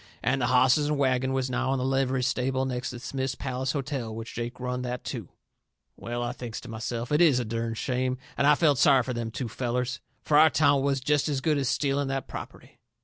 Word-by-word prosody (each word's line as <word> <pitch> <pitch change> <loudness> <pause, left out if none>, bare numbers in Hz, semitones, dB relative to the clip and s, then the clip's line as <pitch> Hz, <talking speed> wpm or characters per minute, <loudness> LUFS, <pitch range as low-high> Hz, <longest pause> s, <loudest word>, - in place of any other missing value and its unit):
And 130 +3 +1
the 120 - +2
hosses 130 +3 +4
and 150 -1 0
wagon 130 -1 +1
was 130 -1 -1
now 130 +1 0
in - - 0
the 130 - -1
livery 135 -1 +1
stable 130 +1 0
next 125 -1 -3
to 125 - -7
Smith's 130 +1 -3
Palace 130 0 -3
Hotel, 135 -5 -3
which 115 0 -7
Jake 120 +1 -5
run 125 0 -3
that 125 0 -4
too. - - -5 0.7
Well, 120 +1 -4
I 120 - -2
thinks 120 -3 -6
to 125 - -11
myself, 115 +2 -4
it 150 +3 +3
IS 150 -7 +5
a 120 - -2
dern 115 +1 -3
shame, 130 +2 -1 0.2
and 140 - +2
I 150 - +7
felt 145 -4 +3
sorry 135 -3 +5
fur 125 - -3
them 120 -1 -3
two 125 +2 -4
fellers. 125 +1 -2 0.2
Fur 150 - +3
our 155 +1 +8
town 145 -2 +3
was 140 -1 0
jest 150 +2 +1
as 140 -2 0
good 150 +1 +1
as 135 -3 0
stealing 140 -1 0
that 135 -1 -3
property. - - -9
130 Hz, 230 wpm, -27 LUFS, 125-140 Hz, 0.7 s, our